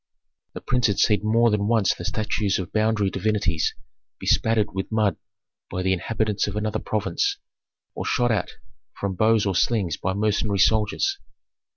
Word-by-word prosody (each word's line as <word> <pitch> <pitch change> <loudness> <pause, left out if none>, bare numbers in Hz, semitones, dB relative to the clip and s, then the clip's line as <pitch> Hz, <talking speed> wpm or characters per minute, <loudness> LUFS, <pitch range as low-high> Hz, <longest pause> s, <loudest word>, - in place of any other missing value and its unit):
The - - -7
prince 125 -1 +1
had 100 - -1
seen 105 - +3
more 115 +2 +3
than 105 -1 0
once 110 -4 +3
the - - -9
statues 105 -1 -1
of 95 - -6
boundary 110 -2 +1
divinities 95 -5 0 0.4
bespattered 110 -3 +1
with 95 +3 -4
mud 105 -5 +2 0.5
by 95 - -3
the 95 0 +2
inhabitants 105 +3 -1
of 100 - -4
another 110 0 -1
province, 400 - -1 0.6
or - - -5
shot 120 -2 +1
at 110 - 0 0.5
from 100 -1 -2
bows 110 +3 +3
or 100 - 0
slings 95 -3 +1
by 95 - -2
mercenary 105 0 0
soldiers. 110 - +2
105 Hz, 160 wpm, -24 LUFS, 100-110 Hz, 0.6 s, seen